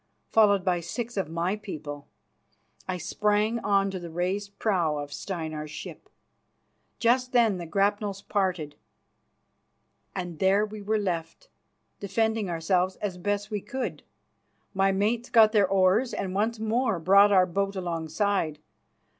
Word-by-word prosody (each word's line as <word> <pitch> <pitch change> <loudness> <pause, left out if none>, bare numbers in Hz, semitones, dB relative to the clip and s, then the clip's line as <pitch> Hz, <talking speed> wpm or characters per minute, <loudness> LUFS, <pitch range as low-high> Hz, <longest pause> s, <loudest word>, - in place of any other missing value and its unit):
Followed 200 -4 +4
by 180 -2 +2
six 235 +8 -5
of 195 -6 -2
my 170 +4 -1
people, 150 -9 -7 0.8
I 185 -1 -2
sprang 210 +6 0
on 195 -2 +1
to 190 - -4
the 170 -1 -8
raised 195 +4 -3
prow 175 -8 +1
of 145 0 -6
Steinar's 155 -5 -5
ship. 150 - -9 0.9
Just 250 +2 +2
then 225 -6 +3
the 170 - -6
grapnels 200 +2 0
parted, 185 -7 -1 1.4
and 175 -4 -5
there 195 +2 +3
we 215 0 -8
were 215 +2 0
left, 185 - -4 0.5
defending 220 +1 0
ourselves 180 +2 0
as 190 -3 -4
best 205 +3 -2
we 210 -1 -2
could. 255 +5 -4 0.7
My 195 0 +3
mates 220 +5 0
got 220 -2 +6
their 205 -3 +4
oars 195 +6 +3
and 190 -2 -3
once 220 +4 0
more 225 -1 0
brought 200 +5 +5
our 185 -2 +6
boat 195 +2 -2
alongside. 170 -1 -1
195 Hz, 140 wpm, -27 LUFS, 175-210 Hz, 1.4 s, got